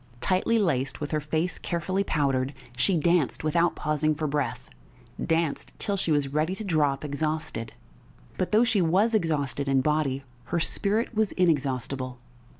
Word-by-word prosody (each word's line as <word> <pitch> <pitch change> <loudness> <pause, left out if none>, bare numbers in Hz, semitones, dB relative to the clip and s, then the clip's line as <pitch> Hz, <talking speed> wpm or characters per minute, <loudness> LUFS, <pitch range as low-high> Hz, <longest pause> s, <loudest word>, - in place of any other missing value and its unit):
Tightly 185 - +2
laced, 135 - 0
with 145 - -4
her 155 - +1
face 160 +3 -1
carefully 185 +3 -1
powdered, 140 -5 0 0.2
she 175 +8 +2
danced 170 -2 +2
without 170 +2 +2
pausing 155 0 0
for 155 +1 -2
breath 145 -2 -2 0.6
danced 165 -2 -1
till 200 - -1
she 185 -4 -1
was 145 -2 +2
ready 155 +5 +1
to 215 - -6
drop 150 -6 +1
exhausted. 150 -5 -2 0.6
But 185 - -2
though 215 +2 +5
she 225 -5 +2
was 190 +7 +3
exhausted 145 -7 0
in 135 -1 +3
body, 140 -2 0 0.2
her 170 +7 -1
spirit 210 +8 0
was 215 -2 +1
inexhaustible.... 135 -6 0
155 Hz, 150 wpm, -27 LUFS, 140-180 Hz, 0.6 s, though